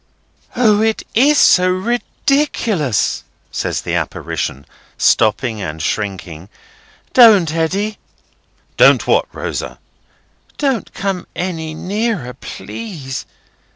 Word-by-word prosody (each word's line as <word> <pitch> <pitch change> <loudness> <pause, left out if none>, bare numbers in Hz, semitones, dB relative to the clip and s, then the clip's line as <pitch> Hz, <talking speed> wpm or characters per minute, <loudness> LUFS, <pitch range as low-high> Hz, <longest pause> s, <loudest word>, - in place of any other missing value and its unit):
"O! 215 -4 +3
it 220 0 0
is 285 +6 +4
so 180 -7 +5
ridiculous!" 220 - 0 0.3
says - - -2
the - - -4
apparition, 70 +1 -3 0.3
stopping 110 0 +2
and 80 -4 -5
shrinking. 90 -1 -4 0.6
"Don't, 205 -10 +7
Eddy!" 195 +6 -1 0.8
"Don't - - +6
what, - - +2
Rosa?" - - -5 0.8
"Don't 270 -7 -1
come 195 -2 -3
any 160 -4 -4
nearer, 200 - -2
please. 140 - -7
185 Hz, 90 wpm, -17 LUFS, -, 0.8 s, Don't